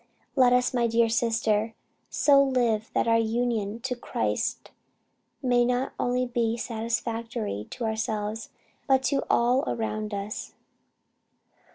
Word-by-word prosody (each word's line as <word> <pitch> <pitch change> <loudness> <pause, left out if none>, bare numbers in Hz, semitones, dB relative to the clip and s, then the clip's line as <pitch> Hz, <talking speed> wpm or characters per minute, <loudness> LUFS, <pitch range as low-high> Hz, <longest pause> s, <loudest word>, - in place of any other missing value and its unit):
"Let 255 -3 +5
us, 250 +1 +3
my 240 -2 +2
dear 230 0 +3
sister, 225 -1 +1 0.3
so 280 -1 +5
live, 240 -5 +1
that - - +2
our 230 0 +4
union 225 -2 -1
to 250 +1 -2
Christ 240 - -2 0.7
may 245 -1 +3
not 250 +2 0
only 250 +1 +1
be 235 -2 0
satisfactory 225 - -3
to 250 - -6
ourselves 220 0 -2 0.4
but 265 -1 +3
to 275 0 +1
all 245 +3 +3
around 215 -1 -2
us. 200 +1 -5
230 Hz, 125 wpm, -26 LUFS, 220-245 Hz, 0.7 s, Let